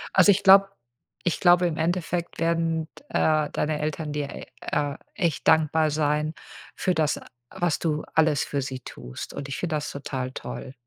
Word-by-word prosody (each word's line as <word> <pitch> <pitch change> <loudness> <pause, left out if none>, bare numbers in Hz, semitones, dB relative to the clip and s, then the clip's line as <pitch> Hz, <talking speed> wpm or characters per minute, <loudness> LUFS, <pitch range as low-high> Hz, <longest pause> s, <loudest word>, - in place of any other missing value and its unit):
Also, 195 +2 +7
ich 200 +1 +1
glaub 195 0 +8 0.6
ich 175 - +1
glaube 175 0 +5
im 160 -2 -3
Endeffekt 170 +1 -1
werden, 165 -1 0 0.2
äh, 155 -1 +2
deine 150 0 -1
Eltern 155 0 -3
dir 145 -1 -2
e - - -8 0.2
äh 145 -1 -1 0.2
echt 170 -5 -1
dankbar 160 0 +4
sein 150 +1 0 0.4
für 185 - 0
das, 155 -3 +1 0.3
was 175 -4 -1
du 155 -2 -1
alles 155 -3 +3
für 140 - -2
sie 130 -1 -5
tust. 60 - -8
Und 140 - -6
ich 135 - -3
finde 160 -4 -1
das 150 - -4
total 130 -2 -4
toll. 130 - -7
155 Hz, 170 wpm, -25 LUFS, 150-170 Hz, 0.6 s, glaub